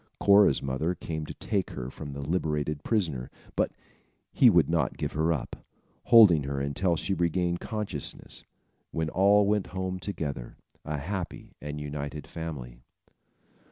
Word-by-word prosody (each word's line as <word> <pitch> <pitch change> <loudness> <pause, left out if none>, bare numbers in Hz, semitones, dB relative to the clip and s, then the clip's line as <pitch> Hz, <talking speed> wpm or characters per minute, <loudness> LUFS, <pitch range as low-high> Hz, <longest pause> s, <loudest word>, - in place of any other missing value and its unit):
Cora's 100 0 +5
mother 70 +7 -1
came 80 -2 -5
to - - -6
take 95 -3 -1
her 65 +1 -6
from 75 -1 -8
the 70 - -6
liberated 75 -1 -1
prisoner; 80 - -1 0.3
but - - +1 0.6
he 125 - +6
would 85 -8 +5
not 80 -5 0
give - - -2
her 80 +2 +1
up, 75 -6 -3 0.5
holding 105 -10 +8
her 70 0 -3
until 70 +6 0
she 85 +5 -1
regained 85 0 0
consciousness, 105 - -5 0.5
when 80 -1 -2
all 100 +2 +5
went 105 -1 +1
home 95 0 -2
together, 75 -10 -5 0.3
a 75 - -3
happy 90 +4 -5
and 75 0 -5
united 75 0 -5
family. 70 -8 -7
80 Hz, 145 wpm, -28 LUFS, 70-95 Hz, 0.6 s, holding